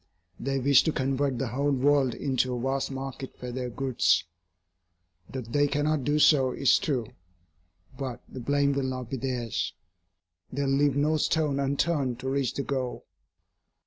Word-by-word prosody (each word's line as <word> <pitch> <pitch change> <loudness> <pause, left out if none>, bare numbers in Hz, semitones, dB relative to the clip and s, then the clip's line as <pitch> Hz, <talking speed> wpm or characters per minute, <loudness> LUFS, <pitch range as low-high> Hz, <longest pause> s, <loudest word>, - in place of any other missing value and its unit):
They 135 +1 -1
wish 135 0 +5
to 160 - +2
convert 135 -1 0
the 130 0 -2
whole 140 +4 0
world 140 -1 +3
into 130 -2 0
a - - -3
vast 135 +2 -1
market 135 0 -6
for 125 0 -6
their 125 0 -3
goods. 115 -8 +2 1.1
That 125 -4 -7
they 145 0 +4
cannot 145 0 0
do 145 +1 +2
so 135 -4 +5
is 130 -2 +4
true, 130 -6 -1 0.9
but 130 -3 -5
the 130 - -8
blame 140 +3 +1
will 140 - 0
not 130 -2 -5
be 135 - -1
theirs. 120 -3 -2 0.8
They 140 +2 -2
will 135 - 0
leave 140 0 +3
no 150 +2 +2
stone 150 -2 +1
unturned 140 -2 0
to 130 - -2
reach 135 -2 0
the 140 - -1
goal. 130 -3 -3
135 Hz, 165 wpm, -27 LUFS, 130-140 Hz, 1.1 s, wish